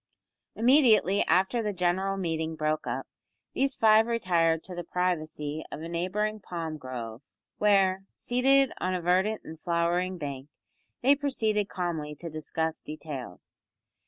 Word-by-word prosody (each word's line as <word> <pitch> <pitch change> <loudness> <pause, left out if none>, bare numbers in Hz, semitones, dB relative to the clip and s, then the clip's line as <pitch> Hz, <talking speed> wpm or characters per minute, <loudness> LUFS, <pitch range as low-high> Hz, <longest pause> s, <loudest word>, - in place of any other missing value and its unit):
Immediately 230 - +5
after 190 +8 +2
the 210 -2 -2
general 185 +2 0
meeting 160 -3 -2
broke 155 -2 -1
up, 125 +3 -3 0.5
these 270 0 +1
five 220 0 +5
retired 170 -8 +1
to 185 - -8
the 175 0 -5
privacy 155 -4 -2
of 155 - -6
a - - -5
neighbouring 195 +6 -1
palm 165 -5 -5
grove, 120 -3 -6 0.4
where, 195 -2 +3
seated 270 +2 +2
on 185 0 -1
a 180 - -2
verdant 190 +5 +2
and 160 0 -10
flowering 175 +1 0
bank, 140 -3 -6 0.5
they 275 +3 +7
proceeded 220 -8 0
calmly 160 -5 -3
to 170 +2 -7
discuss 160 +1 -3
details. 145 - -8
180 Hz, 135 wpm, -28 LUFS, 155-210 Hz, 0.5 s, they